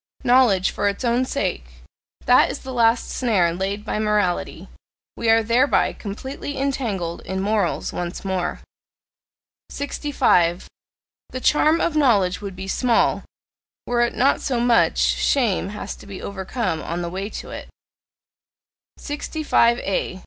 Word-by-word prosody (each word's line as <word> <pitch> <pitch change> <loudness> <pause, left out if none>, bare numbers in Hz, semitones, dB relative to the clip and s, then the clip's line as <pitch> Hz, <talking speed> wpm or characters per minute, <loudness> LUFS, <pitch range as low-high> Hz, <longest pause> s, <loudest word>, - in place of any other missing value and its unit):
"Knowledge 240 -7 +4
for 205 - 0
its 200 +5 -4
own 240 +2 +2
sake" 65 - -2 0.6
that - - +5
is - - -5
the 265 - -7
last 230 -1 +2
snare 195 -9 +1
laid 195 +4 -3
by 210 - -2
morality: 210 -4 -1 0.5
we 230 - -1
are 225 0 +5
thereby 240 +5 +2
completely 265 +7 -6
entangled 225 -11 -2
in 190 0 -4
morals 200 -2 -1
once 175 +2 -5
more. 185 -2 -2 1.1
65. 190 - +1 0.6
The 255 - -5
charm 310 +4 +3
of 335 - 0
knowledge 210 -12 +2
would 200 -2 -6
be 190 +1 -7
small, 235 +3 +2 0.6
were 240 0 0
it 240 - 0
not 270 +3 +2
so 255 -4 -1
much 240 -1 +3
shame 225 -8 +1
has 210 - -6
to - - -14
be 195 -2 -8
overcome 190 -3 -3
on 175 +1 -4
the - - -3
way 195 +3 -4
to - - -8
it. - - -8 1.3
65A. 240 - 0
215 Hz, 135 wpm, -22 LUFS, 190-255 Hz, 1.3 s, that